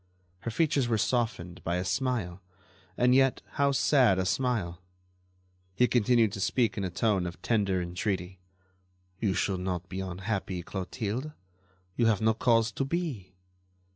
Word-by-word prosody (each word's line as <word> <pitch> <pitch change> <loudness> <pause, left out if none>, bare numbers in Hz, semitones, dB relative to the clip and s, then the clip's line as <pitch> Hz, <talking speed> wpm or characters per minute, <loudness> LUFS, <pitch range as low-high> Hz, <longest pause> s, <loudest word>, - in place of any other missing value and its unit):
Her 115 - -4
features 140 +1 +1
were 115 -2 +1
softened 110 -8 -1
by 85 - -1
a 90 +1 -1
smile, 100 -4 -1 0.6
and 125 +1 +4
yet 135 0 +3
how 140 0 +2
sad 130 -7 +4
a 95 - 0
smile! 95 -5 -1 0.9
He 125 +5 +4
continued 120 -2 +3
to 100 - -6
speak 115 +1 +1
in 100 - -3
a 95 - -1
tone 95 0 +1
of 85 - -8
tender 100 -5 +1
entreaty: 90 +1 -3 0.8
"You 100 -5 0
should 95 -2 0
not 90 -1 -3
be 95 - -5
unhappy, 95 0 -3
Clotilde; 110 - -4 0.6
you 120 - +3
have 110 -3 +3
no 110 0 +3
cause 115 0 +2
to 135 - -2
be." 135 - -3
105 Hz, 150 wpm, -29 LUFS, 95-125 Hz, 0.9 s, and